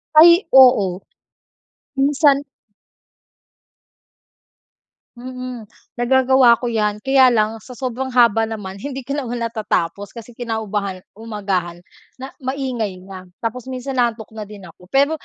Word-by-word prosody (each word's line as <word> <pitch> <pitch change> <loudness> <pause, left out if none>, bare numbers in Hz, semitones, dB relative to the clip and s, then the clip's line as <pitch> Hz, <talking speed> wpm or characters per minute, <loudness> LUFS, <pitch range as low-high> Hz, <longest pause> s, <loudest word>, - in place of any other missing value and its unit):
Ay, 340 +4 +7
oo. 205 -9 +5 1.0
Minsan 280 +1 +3 2.7
mm, 250 -1 -8 0.3
nagagawa 255 -1 +4
ko 245 - -3
yan. 210 -3 -1
Kaya 265 +2 +4
lang 220 -1 +1
sa - - -13
sobrang 260 +1 -4
haba 235 -3 +4
naman 205 -4 -6
hindi 270 -1 -5
ko 280 - -2
naman 245 -4 -4
natatapos. 205 -5 -2
Kasi 235 0 -12
kinaumagahan 215 -5 -4 0.2
umagahan 195 -6 -4 0.4
na, 265 +1 -8
maingay 255 -8 -3
na. 190 0 -10 0.2
Tapos 230 +2 -4
minsan 260 +1 -5
inaantok 235 -3 -1
na 215 - -5
din 200 -3 -12
ako. 170 - -18
Pero 280 +2 +3
235 Hz, 120 wpm, -19 LUFS, 210-260 Hz, 2.7 s, Ay